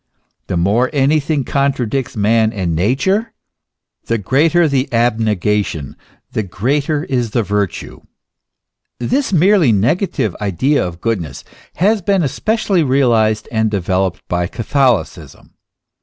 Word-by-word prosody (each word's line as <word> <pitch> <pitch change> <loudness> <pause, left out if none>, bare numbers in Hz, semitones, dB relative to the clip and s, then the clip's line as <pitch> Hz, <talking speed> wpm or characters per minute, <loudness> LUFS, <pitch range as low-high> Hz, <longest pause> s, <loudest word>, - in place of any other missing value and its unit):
The 90 - -2
more 105 +9 +2
anything 145 +1 +1
contradicts 135 -3 -1
man 110 +1 +2
and 90 -5 -2
Nature, 145 - 0 0.7
the 115 - 0
greater 155 - +2
the 140 -2 -1
abnegation, 105 - 0 0.4
the - - -1
greater 140 - -1
is 125 -7 -1
the 115 +2 0
virtue. 100 -1 -3 1.0
This 260 - -1
merely 180 - +4
negative 110 - 0
idea 105 - +1
of 90 -1 -6
goodness 95 - -3 0.3
has 205 +5 +2
been 190 0 +1
especially 200 - 0
realized 115 -6 +2
and 110 -1 +1
developed 95 -2 -2
by 90 0 -1
Catholicism. 125 +2 -1
120 Hz, 110 wpm, -16 LUFS, 105-145 Hz, 1.0 s, merely